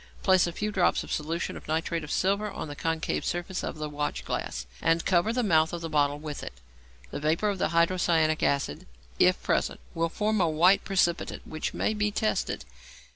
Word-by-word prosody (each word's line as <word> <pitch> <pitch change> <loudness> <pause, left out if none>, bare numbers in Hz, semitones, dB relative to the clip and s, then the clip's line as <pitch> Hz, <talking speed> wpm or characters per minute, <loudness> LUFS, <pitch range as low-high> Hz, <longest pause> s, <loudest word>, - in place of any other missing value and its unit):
Place 185 -2 +5
a - - -2
few 210 +5 -3
drops 185 -3 +2
of - - -9
a - - 0
solution 160 +3 -2
of - - -10
nitrate 165 +1 -1
of 150 - -8
silver 200 +5 +1
on 195 - -6
the 145 - -7
concave 160 +1 -1
surface 175 +2 -3
of - - -4
the 155 0 -3
watchglass, 145 - -3 0.2
and 165 0 +2
cover 185 +3 +3
the 245 +1 0
mouth 160 -6 +3
of 170 - -4
the 165 -1 -5
bottle 145 -1 +2
with 150 -1 -6
it. - - -7 0.6
The - - -4
vapour 160 +8 +1
of 200 -2 -2
hydrocyanic 170 -2 +2
acid, 140 - 0 0.3
if - - +4
present, - - 0
will 165 0 0
form 215 +3 0
a 170 - +3
white 175 +5 +4
precipitate 175 -3 0
which 155 0 -4
may - - 0
be 210 -1 0
tested. 215 +1 -1
165 Hz, 195 wpm, -28 LUFS, 155-190 Hz, 0.6 s, Place